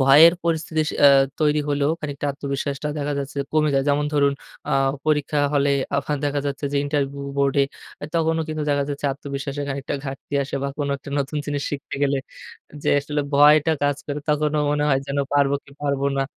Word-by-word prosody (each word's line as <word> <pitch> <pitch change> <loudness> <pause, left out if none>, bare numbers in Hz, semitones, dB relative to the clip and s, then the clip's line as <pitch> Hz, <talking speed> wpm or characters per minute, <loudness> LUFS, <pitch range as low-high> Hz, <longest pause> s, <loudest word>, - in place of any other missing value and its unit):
ভয়ের 145 +5 +8
পরিস্থিতি 160 -1 0
অ্যা 145 - +9 0.3
তৈরি 150 -1 +3
হলেও 145 0 +1
খানিকটা 145 -1 -4
আত্মবিশ্বাসটা 140 +1 -3
দেখা 145 0 -2
যাচ্ছে 140 +1 -5
কমে 155 -1 +3
যায়। 135 0 +2
যেমন 145 +1 +2
ধরুন 140 -1 +3 0.4
আ - - 0 0.3
পরীক্ষা 150 -1 +1 0.2
হলে 140 0 +3 0.3
আফা - - -1
দেখা 145 0 0
যাচ্ছে 140 +1 -3
যে - - +1
ইন্টারভিউ 140 -1 -1 0.2
বোর্ডে 140 0 +3 0.4
আ - - -3
তখনও 160 -1 +1
কিন্তু 155 -1 -3
দেখা 140 -1 +1
যাচ্ছে 145 0 -3
আত্মবিশ্বাসে 140 0 -5
খানিকটা 140 0 -3
ঘাটতি 135 +1 -6
আসে 140 - -6
বা 140 - -1
কোন 145 -1 -1
একটা 140 - -11
নতুন 140 +2 -2
জিনিস 145 -1 -2
শিখতে 145 -1 -5
গেলে 140 0 +2 0.7
যে - - +2
আসলে 145 +1 -2
ভয়টা 150 +2 +6
কাজ 145 -1 +1
করে 145 0 -3
তখনও 150 0 +1
মনে 145 0 +1
হয় 135 -1 +3
যেন 140 +1 -3 0.2
পারবো 140 -1 +3
কি - - -18
পারব 140 -1 -1 0.2
না? 135 - +2
145 Hz, 185 wpm, -23 LUFS, 140-150 Hz, 0.7 s, অ্যা